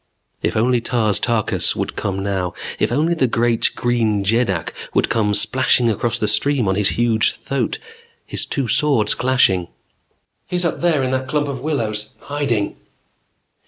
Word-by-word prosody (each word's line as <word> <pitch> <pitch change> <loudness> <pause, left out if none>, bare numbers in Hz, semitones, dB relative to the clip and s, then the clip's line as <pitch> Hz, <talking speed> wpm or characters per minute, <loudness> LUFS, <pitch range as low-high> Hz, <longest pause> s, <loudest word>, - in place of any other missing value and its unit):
If - - -1
only 120 +2 +2
Tars 110 -4 +1
Tarkas 115 -3 0
would - - -3
come 95 0 -3
now. 95 -3 -2 0.2
If - - +1
only 155 +7 +1
the 140 -6 +1
great 115 0 +2
Green 115 -4 0
Jeddak 100 -5 0 0.2
would - - +2
come 105 -2 +1
splashing 125 +1 +2
across 115 +2 -1
the - - -1
stream 140 -6 +1
on 95 - +2
his 100 +1 +2
huge 115 -2 +3
thoat, 135 -3 -2 0.5
his - - -4
two 135 -3 -2
swords 120 -6 +3
clashing 120 -9 +2 0.8
"He's 180 0 -1
up 170 - -1
there 165 -6 +2
in 130 - -1
that 130 0 -1
clump 145 +1 0
of 135 -2 -4
willows 110 -8 -2
hiding!" 140 -8 -2
120 Hz, 160 wpm, -19 LUFS, 105-135 Hz, 0.8 s, huge